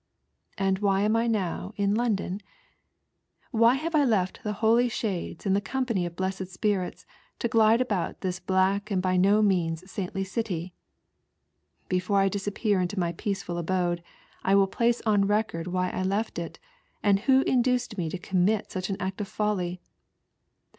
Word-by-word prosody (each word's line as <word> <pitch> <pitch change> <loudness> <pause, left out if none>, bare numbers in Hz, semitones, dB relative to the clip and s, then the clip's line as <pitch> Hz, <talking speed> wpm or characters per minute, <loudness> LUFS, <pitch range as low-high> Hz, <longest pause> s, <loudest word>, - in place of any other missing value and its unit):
And 195 -1 +1
why 195 -1 +2
I - - +2
&m 215 +2 +2
I 230 +1 +2
now 200 -2 -2
in 200 0 +2
London? 210 -4 -1 1.1
"ttlny 230 +2 +5
have 330 +4 -3
I 300 -2 +4
left 205 -8 0
the 210 - -2
holy 230 +4 +3
shades 210 -8 -3
and 195 -1 +3
the 200 - +1
company 230 -7 -1
of 170 - -9
blessed 190 0 -3
spirits 190 0 -2 0.3
to 235 - -1
glide 225 0 +4
about 205 -9 -2
this 185 -1 -2
black 195 +3 +1
and 195 -3 +1
by 185 0 +1
no 200 +4 +4
means 180 -2 0
saintly 195 0 -3
city? 185 -3 -3 1.1
Before 185 +2 0
I 195 0 +3
disappear 205 0 0
into 180 +3 -2
my 170 -2 0
peaceful 180 -1 -3
abode 175 0 0 0.4
I 195 - +3
will 200 0 +6
place 235 +4 0
on 205 -2 +3
record 205 -5 0
why 180 0 -1
I - - -3
left 200 +2 -1
it, 170 - -6 0.5
and 200 -1 +4
who 265 +5 +4
induced 250 -2 +1
me 170 -5 -2
to 185 - -4
commit 190 +4 0
such 185 0 -3
an 195 - -2
act 190 +2 -3
of 205 - -3
folly. 185 -4 -2
195 Hz, 170 wpm, -27 LUFS, 185-220 Hz, 1.1 s, will